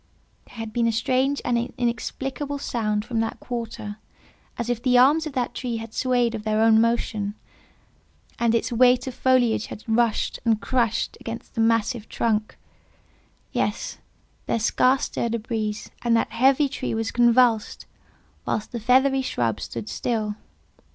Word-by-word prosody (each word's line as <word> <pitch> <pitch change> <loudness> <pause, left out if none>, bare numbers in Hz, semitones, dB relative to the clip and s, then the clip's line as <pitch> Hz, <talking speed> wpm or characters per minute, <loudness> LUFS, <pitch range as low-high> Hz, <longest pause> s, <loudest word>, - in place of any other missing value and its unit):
There - - -17
had 225 -2 -6
been 235 -1 +2
a - - +2
strange 260 +5 0
and 245 - +1 0.2
inexplicable 265 +4 -3
sound 215 -6 -1
from 235 -2 -2
that 225 0 -2
quarter, 230 -3 -5 0.6
as 235 -1 -3
if 240 -1 -1
the 250 -1 +3
arms 295 +6 +5
of 300 - -7
that 250 -2 -1
tree 240 -3 -3
had 225 0 -8
swayed 245 -2 +1
of 225 - -4
their 215 0 0
own 220 0 +5
motion, 220 -3 0 1.0
and 235 -1 +2
its 230 - 0
weight 250 +1 +4
of 260 - -5
foliage 245 -4 +2
had 210 - -9
rushed 230 -1 +1
and 225 -2 +2
crushed 230 +2 0
against 230 0 -7
the 225 - -1
massive 230 0 +1
trunk. 215 -2 -1 0.9
Yes; - - -2 0.5
there - - +1
scarce 255 +4 +2
stirred 235 0 -2
a - - -2
breeze, 215 -1 -4
and 235 -1 +3
that - - -1
heavy 270 +5 +4
tree 270 -4 -3
was 225 0 -2
convulsed, 240 -2 +3 0.6
whilst 215 - -3
the 235 - -4
feathery 265 +4 +3
shrubs 115 - -1
stood 115 -2 -6
still. 215 - -2
235 Hz, 160 wpm, -24 LUFS, 220-250 Hz, 1.0 s, arms